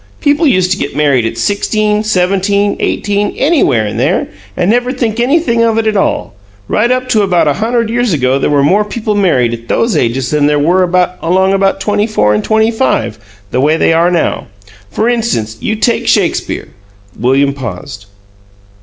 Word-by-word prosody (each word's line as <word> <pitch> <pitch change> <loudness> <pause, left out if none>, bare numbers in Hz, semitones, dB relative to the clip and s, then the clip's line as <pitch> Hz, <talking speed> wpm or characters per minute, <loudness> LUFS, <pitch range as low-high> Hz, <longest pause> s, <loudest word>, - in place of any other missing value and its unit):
People 295 +2 +2
used 185 -7 +2
to 190 - 0
get 140 -1 -4
married 140 -6 +2
at 115 - -6
sixteen, 210 - 0
seventeen, 200 0 0
eighteen 205 0 -1
anywhere 275 - +2
in 105 - -4
there - - 0 0.3
and 180 +4 +1
never 245 +2 0
think 235 -3 -2
anything 250 -2 +1
of 225 -1 +1
it 225 - 0
at 215 -1 0
all. 195 - -1 0.3
Right 225 +3 +1
up 255 0 0
to 220 -3 +2
about 175 -5 +1
a 145 - +2
hunderd 230 +4 -1
years 240 -1 0
ago 135 -3 +1
there - - 0
were 145 -1 +2
more 195 +9 +3
people 215 0 -3
married 145 - +1
at 115 0 -8
those 230 -1 0
ages 125 +1 -1
than 150 -1 +2
there 150 0 +2
were 175 +6 +2 0.4
along 190 +3 +1
about 195 0 +1
twenty 210 +1 0
four 105 - +1
and 105 - -1
twenty 220 +1 +2
five, 225 - -1 0.3
the 130 - 0
way 155 +3 +2
they 165 - +2
are 170 +2 +3
now. 175 -2 -1 0.4
For 215 - -1
instance, 220 - -1
you 220 - -1
take 230 +2 0
Shakespeare - - 0 0.3
" 100 -1 -25
William 135 +4 +2
paused. 125 -4 -8
195 Hz, 190 wpm, -12 LUFS, 140-220 Hz, 0.4 s, more